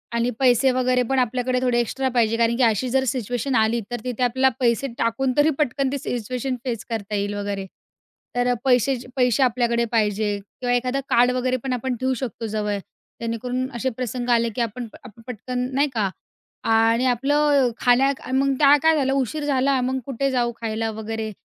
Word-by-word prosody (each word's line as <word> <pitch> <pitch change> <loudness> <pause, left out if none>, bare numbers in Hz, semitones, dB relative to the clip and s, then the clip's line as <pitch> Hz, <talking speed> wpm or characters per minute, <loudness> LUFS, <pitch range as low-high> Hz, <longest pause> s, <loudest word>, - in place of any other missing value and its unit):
आणि 235 +1 +1
पैसे 260 0 +4
वगैरे 255 0 +1
पण 270 -1 +2
आपल्याकडे 250 +1 0
थोडे 250 -2 +2
एक्स्ट्रा 260 +3 -1
पाहिजे. 230 -2 +1
कारण 235 0 +2
की 260 - +2
अशी 230 +2 +2
जर 265 +2 +2
सिच्युएशन 245 +2 -2
आली, 220 +1 +2
तर 240 - -3
तिथे 250 0 -2
आपल्याला 260 +2 +3
पैसे 240 +2 +1
टाकून 230 +3 0
तरी 295 +2 +5
पटकन 275 -1 0
ती 280 - -1
सिच्युएशन 250 +1 -3
फेस 235 -4 -3
करता 215 -2 -3
येईल 205 0 -1
वगैरे. 200 -1 -3 0.7
तर 245 0 +2
पैसे 260 +1 +3 0.2
पैसे 250 0 +3
आपल्याकडे 235 -1 +1
पाहिजे 215 -2 +1
किंवा 245 +5 -4
एखादा 250 +2 0
कार्ड 245 +1 +4
वगैरे 255 0 0
पण 265 -1 -1
आपण 250 +1 -2
ठेवू 260 +2 0
शकतो 235 -3 -5
जवळ. 210 -1 -2 0.4
जेणेकरून 245 +3 -3
असे 260 +2 -1
प्रसंग 250 0 -4
आले, 235 -1 +3
की - - -1
आपण 235 +1 -3 0.2
आप 230 -3 -14
पटकन 250 +2 -4
नाही 285 +2 +3
का? 210 -4 0 0.5
आणि 225 +2 +3
आपलं 275 +1 +2
खाण्या 255 +3 +4 0.2
मग 275 +1 +2
त्या 285 -1 +7
काय 320 0 +5
झालं 270 -3 +1
उशीर 275 +3 -1
झाला 270 -1 +2
मग 260 +1 -1
कुठे 275 +1 -1
जाऊ 240 -2 +1
खायला 225 0 -2
वगैरे? 220 0 -5
245 Hz, 180 wpm, -23 LUFS, 230-260 Hz, 0.7 s, त्या